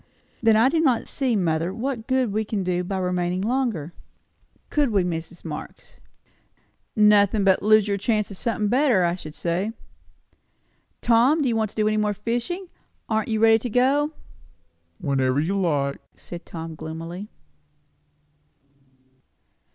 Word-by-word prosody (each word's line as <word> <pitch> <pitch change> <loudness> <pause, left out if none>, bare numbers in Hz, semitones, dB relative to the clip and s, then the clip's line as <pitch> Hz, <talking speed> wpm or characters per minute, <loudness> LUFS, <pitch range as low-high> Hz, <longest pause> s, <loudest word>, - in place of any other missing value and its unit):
"Then 225 -1 +5
I 225 +3 +5
do 320 +4 +1
not 260 -8 +2
see, 260 -4 0
mother, 165 -2 0
what 235 +1 -4
good 260 -5 +1
we 215 +1 0
can 210 -2 -3
do 180 0 -1
by 190 +2 -3
remaining 180 0 -1
longer. 220 - -1 0.8
Could 295 -3 +2
we, 200 -4 +2
Mrs. 170 0 -5
Marx?" 150 -2 -8 1.0
"Nothin', 210 -1 +4
but 190 -1 +3
lose 215 0 +4
your 200 -1 0
chance 210 0 0
o' - - -6
somethin' 215 +1 -1
better, 245 -4 +3
I 170 0 +2
should 155 -4 -8
say." 180 +7 -2 1.3
"Tom, 245 +7 +4
do - - +1
you 235 - +1
want 220 -2 0
to - - -20
do 215 -1 +1
any 215 0 +1
more 210 -1 0
fishing? 240 - -3 0.4
Aren't 220 0 0
you 220 -1 0
ready 225 0 +5
to 245 - -4
go?" 275 +6 +2 0.8
"Whenever 135 +1 0
you 165 +6 0
like," 145 -8 0
said 175 -1 -10
Tom 165 -1 -7
gloomily. 165 +5 -7
210 Hz, 150 wpm, -24 LUFS, 175-230 Hz, 1.3 s, Then